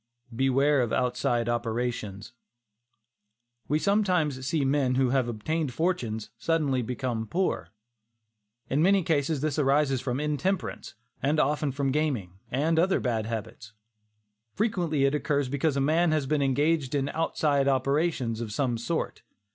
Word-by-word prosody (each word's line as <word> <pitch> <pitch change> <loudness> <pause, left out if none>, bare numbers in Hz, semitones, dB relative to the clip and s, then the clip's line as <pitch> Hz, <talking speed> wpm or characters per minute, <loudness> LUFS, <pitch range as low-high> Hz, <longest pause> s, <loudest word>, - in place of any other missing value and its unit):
BEWARE 135 +2 +3
OF 120 -2 -1
"OUTSIDE 125 -2 0
OPERATIONS." 120 -2 -3 1.3
We 150 - +2
sometimes 170 -9 +1
see 145 -1 +1
men 135 -2 +2
who 130 -1 +2
have 130 -2 +2
obtained 130 +5 -2
fortunes, 120 - -1
suddenly 150 -6 +1
become 120 -1 -3
poor. 175 - -1 1.0
In 140 +3 +1
many 195 +2 +4
cases 150 -2 0
this 155 0 -1
arises 135 -2 +2
from 125 0 -2
intemperance, 150 +6 -2 0.3
and 145 +4 +1
often 150 0 +1
from 135 0 -1
gaming, 125 - -1
and 160 +5 +1
other 185 +3 +3
bad 115 -3 -1
habits. 110 -1 -6 0.8
Frequently 175 -10 +1
it 140 - +2
occurs 145 -2 0
because 140 +1 0
a - - +2
man 160 +4 +2
has 155 -3 +1
been 150 +1 0
engaged 145 +1 +1
in 140 0 0
"outside 145 -3 +1
operations," 135 -3 0
of 110 -2 -4
some 120 0 -1
sort. 160 +8 -3
140 Hz, 140 wpm, -27 LUFS, 125-155 Hz, 1.3 s, many